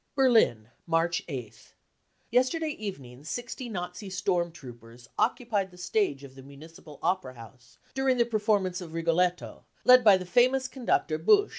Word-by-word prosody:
" - - -48
Berlin, 225 - +3 0.2
March 165 +1 +1
8th. 125 -8 -8 0.6
Yesterday 260 +7 +1
evening 140 - -8
sixty 245 - -6
Nazi 180 0 -6
storm 180 -2 -1
troopers 120 -5 -13
occupied 210 -6 0
the 180 - -17
stage 180 -7 -1
of 135 -1 -12
the 135 - -13
Municipal 150 +2 -14
Opera 175 -7 -1
House, 115 0 -15 0.2
during 265 -1 +1
the 235 - +3
performance 205 -5 0
of 165 -2 -9
Rigolette 170 +2 +1
7 - - -10
^ - - -22 0.2
led 250 0 +7
by 205 -4 +7
the 185 - -7
famous 255 +7 +3
conductor 235 - -1
Busch. 405 - +4
180 Hz, 160 wpm, -28 LUFS, 140-230 Hz, 0.6 s, led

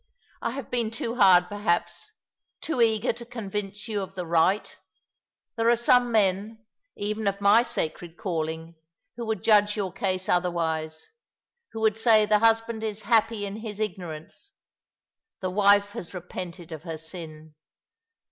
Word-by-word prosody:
"I - - -1
have 275 -2 -7
been 235 -3 0
too 230 +1 -4
hard, 180 -4 +6
perhaps, 175 - -2 0.5
too 315 -7 -2
eager 220 -2 +2
to 240 - -10
convince 210 -3 -5
you 210 -2 -2
of 190 0 -7
the 180 -2 -4
right! 170 +5 +1 0.8
There 230 0 +2
are 240 - +5
some 245 +1 +3
men, 215 +1 0 0.3
even 210 +1 -3
of 200 0 0
my 200 +3 +6
sacred 170 -6 -4
calling, 165 -4 -3 0.4
who 235 -1 -5
would 220 -4 -2
judge 210 -1 +4
your 190 -3 -2
case 185 -1 -2
otherv; 175 -1 +1
ise 160 -1 -3 0.3
— 475 -1 -59
who 225 - -5
would 220 0 +2
say 220 -2 +5
the 210 0 +3
husband 225 0 +2
is 215 -1 -3
happy 225 -2 +2
in 200 +1 -5
his 215 -2 -7
ignorance; 180 - -6 0.9
the 185 -2 -3
wife 200 +1 +4
has 180 -1 -8
repented 175 -1 -7
of 160 -2 -6
her 165 -2 -6
sin. 160 -1 -9
205 Hz, 155 wpm, -26 LUFS, 175-225 Hz, 0.9 s, hard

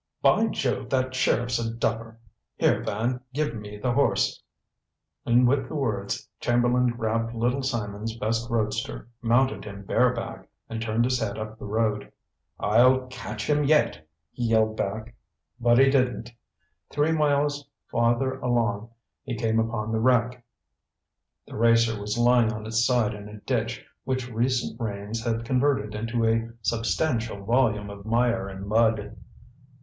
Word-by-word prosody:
"By 225 +1 +4
Jove, 130 - -2
that 130 -1 0
sheriff's 120 -1 +1
a 115 -1 -2
duffer! 115 0 -2 0.4
Here, - - +2
Van, 115 +4 -2
give 150 -5 0
me 105 -2 -8
the 125 +4 -1
horse." 120 - +1 0.9
And 120 +1 +5
with 135 0 +1
the - - -6
words 105 -9 -2
Chamberlain 120 +1 +2
grabbed 115 0 -1
Little 120 +4 0
Simon's 115 -3 -3
best 115 +1 -1
roadster, 110 -1 -2
mounted 120 -3 +2
him 100 -1 -8
bareback, - - 0 0.2
and 115 0 -5
turned 115 +1 +1
his 125 0 +1
head 110 -2 -3
up 110 0 -6
the - - -7
road. 105 -1 -1 0.5
"I'll 125 +5 +4
catch 115 -4 -6
him 150 0 +2
yet!" 115 - +2 0.2
he 120 - -3
yelled 110 -1 +2
back. 110 +3 -3 0.5
But 120 0 +4
he 135 +1 +6
didn't. 125 -3 0 0.6
Three 150 +2 +1
miles 145 -2 +1 0.2
farther 120 +3 +1
along 115 -3 0 0.3
he 125 -3 -4
came 115 0 +1
upon 110 -1 -2
the 110 - 0
wreck. 125 0 +2 1.0
The - - -11
racer 115 -1 +3
was 105 +2 -3
lying 120 -1 +4
on 110 -1 -6
its 110 +1 +1
side 120 -3 +2
in 105 0 -9
a 105 0 -10
ditch 120 -1 -2 0.2
which 130 -1 -3
recent 120 +1 -1
rains 105 +1 -4
had 115 -1 -1
converted 130 -4 +1
into 115 +2 -1
a 115 0 +1
substantial 115 -2 -1
volume 110 -3 +1
of 100 0 -10
mire 115 -1 +1
and 95 0 -7
mud. 110 -1 +1
115 Hz, 150 wpm, -26 LUFS, 110-125 Hz, 1.0 s, he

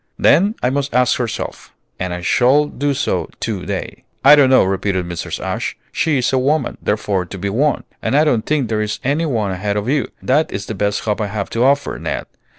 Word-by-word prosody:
"Then 205 +5 +4
I 125 - +2
must 140 -2 -2
ask 125 0 +3
herself, 120 -3 -5 0.2
and 90 -1 -2
I 90 0 -4
shall 130 +10 +3
do 145 0 -2
so - - -1
to - - -3
day." - - -5 0.2
"I 150 - +10
don't 140 -3 +5
know," 130 - +6
repeated 95 -1 -1
Mrs. 85 -1 -5
Ashe. - - -3
"'She 155 -3 +1
is 125 +1 0
a 130 - +3
woman, 145 +5 0
therefore 105 -3 0
to 95 - -8
be 100 +2 -2
won:' 145 +7 +1 0.2
and 135 - +1
I 150 - +5
don't 120 -8 +2
think 150 -5 +1
there 110 -1 -1
is 105 -1 -2
any 145 +5 0
one 110 -8 -1
ahead 100 +2 -2
of 105 +2 -2
you; 140 +1 +1 0.2
that 150 +5 +2
is 100 0 -4
the - - -5
best 100 0 -1
hope 110 0 -1
I 105 - -1
have 100 -1 -4
to 115 - +1
offer, 140 +2 +1
Ned. - - -3
120 Hz, 225 wpm, -18 LUFS, 100-140 Hz, 0.2 s, I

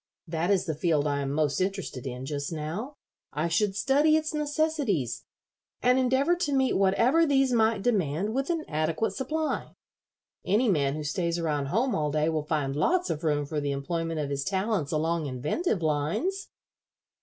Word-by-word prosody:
That 165 +2 -1
is 195 -3 +2
the 160 - -1
field 155 -1 +1
I 145 -1 0
am 135 -1 -2
most 150 +2 0
interested 185 -9 -3
in 125 0 -5
just 140 +1 -3
now. 165 - -4 0.4
I 155 +3 0
should 190 +4 +1
study 285 +8 +3
its 310 0 -2
necessities, 295 - -1 0.5
and 250 +1 +3
endeavor 260 +6 +3
to 300 -5 -1
meet 265 -1 +2
whatever 230 +11 +3
these 270 -4 +3
might 220 -3 +2
demand 200 -3 0
with 270 +4 -1
an 330 -2 -1
adequate 155 +7 0
supply. 305 +4 -3 0.7
Any 220 +5 +2
man 145 -6 +1
who 155 - -4
stays 170 +2 -1
around 150 -4 -1
home 235 - +1
all 150 -1 0
day 155 +2 +1
will 160 -1 0
find 145 -4 -1
lots 355 - +1
of 155 - -4
room 145 -2 +1
for 150 +1 -3
the 145 -1 -1
employment 165 +3 -2
of 145 -2 -2
his 140 -1 -1
talents 195 -3 -1
along 160 0 0
inventive 155 - -1
lines." 160 - -1
170 Hz, 175 wpm, -27 LUFS, -, 0.7 s, study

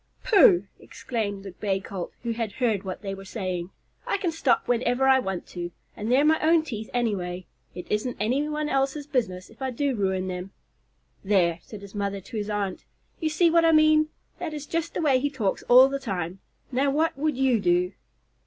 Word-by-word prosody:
"Pooh!" 200 - +6
exclaimed 205 -5 -4
the 195 - -7
Bay 195 +1 -1
Colt, 190 -2 -6
who 235 - -1
had 225 -3 -3
heard 225 -6 0
what 190 +1 -6
they 195 -1 -3
were 195 0 -8
saying. 185 -4 -4 0.4
"I - - +1
can 370 -4 -1
stop 310 -6 +1
whenever 245 +2 +2
I 265 0 +6
want 190 -7 -3
to, 175 -1 -5 0.3
and 215 +3 -3
they're 275 +4 +5
my 315 +1 +4
own 320 0 +4
teeth, 220 -8 -6
anyway. 185 -7 -2 0.3
It 180 0 -6
isn't 215 +4 -1
anybody 295 +7 0
else's 275 +2 0
business 220 -11 -2
if - - -20
I 265 - -1
do 275 +2 -1
ruin 190 -2 0
them." 185 +1 -5 0.7
"There!" 180 -4 +2
said 210 -3 -11
his 200 - -11
mother 200 -1 -2
to 205 +4 -8
his 210 0 -3
aunt, 205 -2 -2 0.4
"you 320 - 0
see 330 +2 +3
what 335 0 +5
I 325 -1 +5
mean. 310 0 +5 0.3
That 330 -3 -4
is 295 -1 -6
just 330 +2 -3
the - - -1
way 270 -4 +4
he 285 +2 0
talks 225 -9 -1
all 255 +2 +9
the 275 0 -3
time. 190 -7 -4 0.3
Now 270 +3 +2
what 310 +4 +1
would 295 -1 -1
you 260 -4 +3
do?" 180 -1 +2
230 Hz, 200 wpm, -26 LUFS, 195-285 Hz, 0.7 s, all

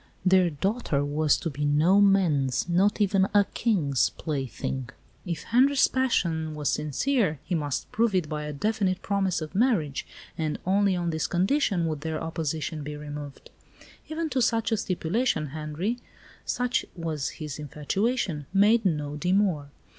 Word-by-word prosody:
Their 185 -1 +5
daughter 160 - -1
was 150 +1 +2
to 165 - -4
be 145 +2 -4
no 155 +7 +4
man's 170 -11 +3
not 190 +5 +2
even 195 -2 +3
a 205 -1 +6
King's 160 - +1
plaything. 135 -3 -4 0.4
If 170 -3 -3
Henri's 265 +4 +4
passion 165 -12 0
was 150 -1 -1
sincere, 155 - 0
he - - -4
must 145 -5 -2
prove 225 -2 +1
it 180 -4 +1
by 150 0 -4
a 150 - -4
definite 190 +3 -1
promise 195 -4 0
of 155 +1 -6
marriage; 195 - +1 0.3
and 155 -2 -2
only 195 +1 +3
on 175 -1 -1
this 160 -1 -1
condition 190 - +1
would 155 -3 -2
their 160 0 -3
opposition 160 -1 -3
be 150 +1 -6
removed. 145 -1 -8 0.6
Even 320 +1 -2
to 260 - +1
such 230 -1 +1
a 225 - +2
stipulation 185 - -1
Henri, 155 - -3 0.5
such 250 0 0
was 160 -4 -3
his 150 -3 -6
infatuation, 150 - -2
made 215 +4 +5
no 150 -4 -1
demur. 180 -4 +1
170 Hz, 150 wpm, -27 LUFS, 150-205 Hz, 0.6 s, a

